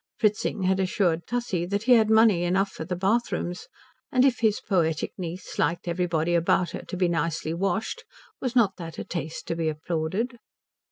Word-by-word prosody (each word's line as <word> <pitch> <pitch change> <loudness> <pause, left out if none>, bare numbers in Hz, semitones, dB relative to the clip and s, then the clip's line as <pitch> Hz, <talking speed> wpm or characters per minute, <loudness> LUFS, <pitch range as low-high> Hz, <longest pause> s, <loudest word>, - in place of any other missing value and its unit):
Fritzing 210 -2 0
had 190 +1 +2
assured 180 -3 +1
Tussie 225 -8 -1
that 200 +3 -1
he 255 - +2
had 220 -3 +6
money 220 -5 +5
enough 190 +3 +1
for 160 - -6
the 180 +3 -3
bathrooms; 190 -2 -1 0.4
and 255 -2 +4
if 260 -3 +2
his 220 -3 +2
poetic 165 -6 0
niece 180 0 -6
liked 170 +1 0
everybody 170 -1 0
about 170 +1 +2
her - - -5
to 185 - -7
be 180 -1 +2
nicely 165 -1 -1
washed 205 - -2 0.4
was 255 -2 -3
not 215 -6 +3
that 165 -3 -8
a - - -4
taste 160 -2 -5
to 165 - -2
be 165 -1 0
applauded? 170 +10 -2
185 Hz, 180 wpm, -26 LUFS, 170-220 Hz, 0.4 s, had